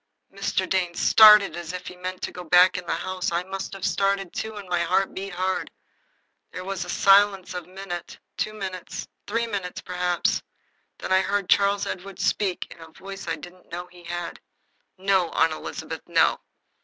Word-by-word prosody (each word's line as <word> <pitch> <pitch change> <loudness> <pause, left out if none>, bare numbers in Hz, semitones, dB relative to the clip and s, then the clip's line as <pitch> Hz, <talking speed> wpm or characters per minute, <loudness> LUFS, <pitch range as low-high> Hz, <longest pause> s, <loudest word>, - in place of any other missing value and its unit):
Mr. 185 - -1
Dane 180 -2 0
started 210 -2 +8
as 175 0 -6
if 180 - -6
he 180 - -8
meant 185 0 -6
to - - -2
go 180 - -8
back 180 +2 +6
into 180 -2 -5
the - - 0
house. 185 -1 -3
I 170 +1 0
must 190 +1 -5
have 195 - -4
started, 195 -2 0
too, 220 0 -4
and 205 -2 -8
my 175 -1 0
heart 185 +3 +1
beat 195 -1 -6
hard. 185 +1 -1 0.8
There 185 - -6
was 190 0 -3
a - - -10
silence 195 -2 +4
of 180 -1 -5
a - - -21
minute, 185 -2 -7 0.2
two 215 - -1
minutes, 190 -3 -6 0.2
three 230 +3 0 0.4
perhaps. 180 -1 0 0.6
Then - - -6
I 190 - +5
heard 200 -1 -1
Charles 200 0 +4
Edward 190 +1 -6
speak, 190 -4 0
in 170 - -12
a 165 - -10
voice 195 +4 -9
I - - 0
didn't 180 +1 -14
know 175 +1 -5
he 175 -1 -15
had. 175 0 -5 0.6
"No, 190 -2 +2
Aunt 160 -1 +3
Elizabeth, - - -6
no. - - +3
185 Hz, 185 wpm, -25 LUFS, 180-195 Hz, 0.8 s, started